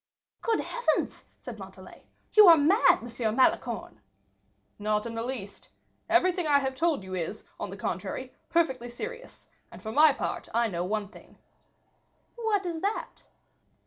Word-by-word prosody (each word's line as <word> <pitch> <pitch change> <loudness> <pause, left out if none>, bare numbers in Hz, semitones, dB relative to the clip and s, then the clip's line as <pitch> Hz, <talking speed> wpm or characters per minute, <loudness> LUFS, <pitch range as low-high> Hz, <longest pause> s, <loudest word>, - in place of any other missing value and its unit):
"Good 455 -1 +1
heavens!" 485 0 -1
said - - -9
Montalais; - - -12 0.3
"you 425 -2 +9
are 335 -1 +9
mad, 345 +10 +4
M. 225 -2 -2
Malicorne." 260 - +1 0.8
"Not 210 +1 0
in 230 - -5
the 230 - -3
least. 230 -5 -6 0.4
Everything 355 0 +3
I 290 -1 +5
have 265 -1 -1
told 305 - 0
you 190 0 -8
is, 185 +4 -4 0.2
on - - -4
the - - -8
contrary, - - -4 0.2
perfectly 265 -8 +1
serious; 480 - -8 0.2
and, - - -11
for 220 - -6
my 305 +6 +7
own 280 - 0
part, - - -4
I 235 -1 +2
know 175 -3 -2
one 210 +1 -2
thing." - - -17 1.0
"What 440 -5 -1
is 335 -2 -3
that?" 405 +2 -3
275 Hz, 155 wpm, -28 LUFS, 220-355 Hz, 1.0 s, you